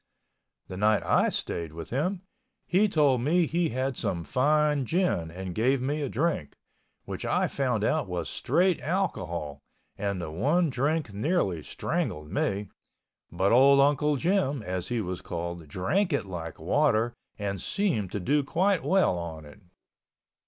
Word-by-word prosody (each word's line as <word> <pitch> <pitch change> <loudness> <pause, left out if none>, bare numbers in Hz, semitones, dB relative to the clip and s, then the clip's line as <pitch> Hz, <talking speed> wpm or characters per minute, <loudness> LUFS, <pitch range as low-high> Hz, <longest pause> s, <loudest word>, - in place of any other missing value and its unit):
The 95 - -7
night 105 +2 +3
I - - +3
stayed 85 -2 -3
with 80 0 -8
him, 175 +9 -1 0.4
he 205 +4 +3
told 145 -8 +3
me 165 +6 +3
he 170 +2 0
had 130 +2 -2
some 85 -6 -2
fine 150 - +2
gin 170 - 0
and 90 +2 -6
gave 125 +6 +2
me 145 +4 -1
a 140 - -2
drink, 140 - -1 0.5
which - - -6
I - - +1
found 125 -6 -1
out 155 +2 +1
was 90 -3 -3
straight 180 -1 +1
alcohol 90 - -2 0.4
and 100 -2 -2
the 85 -3 -5
one 150 - +1
drink 140 -2 -1
nearly 105 - 0
strangled 75 +1 -3
me, 100 0 -1 0.6
but 95 +1 +1
old 135 +3 +6
Uncle 145 +1 +3
Jim, 145 - 0
as 90 -1 -3
he 120 0 -1
was 90 -2 -4
called, 85 -1 -5
drank 170 - 0
it 140 - 0
like 85 -4 -6
water 115 +2 +2 0.2
and 100 -3 -3
seemed 140 - 0
to 105 - -1
do 145 +10 +1
quite 185 +6 +1
well 185 - +2
on 80 -2 -7
it. 75 +8 -15
125 Hz, 155 wpm, -27 LUFS, 90-155 Hz, 0.6 s, old